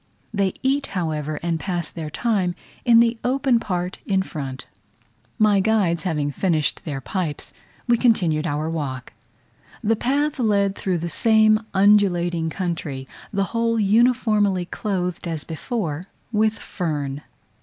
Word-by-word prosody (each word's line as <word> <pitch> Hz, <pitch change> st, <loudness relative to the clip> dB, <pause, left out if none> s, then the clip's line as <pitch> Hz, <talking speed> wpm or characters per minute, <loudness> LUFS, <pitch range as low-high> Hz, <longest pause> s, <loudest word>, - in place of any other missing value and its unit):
They 195 Hz, -3 st, 0 dB
eat, 275 Hz, +1 st, +1 dB
however, 155 Hz, -3 st, -2 dB
and 170 Hz, -1 st, 0 dB
pass 175 Hz, -4 st, -3 dB
their 160 Hz, -3 st, -5 dB
time 190 Hz, -1 st, 0 dB, 0.3 s
in 235 Hz, -2 st, +7 dB
the 230 Hz, 0 st, +1 dB
open 260 Hz, -1 st, +2 dB
part 180 Hz, -4 st, -3 dB
in 190 Hz, -1 st, +2 dB
front. 135 Hz, -7 st, -6 dB, 0.7 s
My 210 Hz, -3 st, +4 dB
guides 190 Hz, -5 st, +1 dB
having 150 Hz, -5 st, 0 dB
finished 160 Hz, -1 st, 0 dB
their 145 Hz, -4 st, -3 dB
pipes, 165 Hz, -1 st, -4 dB, 0.3 s
we 240 Hz, -1 st, +4 dB
continued 170 Hz, -10 st, +2 dB
our 150 Hz, 0 st, -1 dB
walk. 140 Hz, -6 st, -4 dB, 0.7 s
The 225 Hz, +2 st, +3 dB
path 280 Hz, +6 st, 0 dB
led 200 Hz, -4 st, +2 dB
through 185 Hz, -2 st, -1 dB
the 170 Hz, +1 st, -3 dB
same 215 Hz, +4 st, +4 dB, 0.2 s
undulating 175 Hz, -5 st, +3 dB
country, 160 Hz, -7 st, -4 dB, 0.2 s
the 200 Hz, -2 st, +1 dB
whole 230 Hz, 0 st, +1 dB
uniformly 210 Hz, -3 st, +3 dB
clothed 180 Hz, -3 st, -3 dB
as 160 Hz, -3 st, -3 dB
before 165 Hz, -, -4 dB, 0.3 s
with 215 Hz, 0 st, +2 dB
fern. 145 Hz, -6 st, -3 dB
185 Hz, 135 wpm, -23 LUFS, 160-220 Hz, 0.7 s, in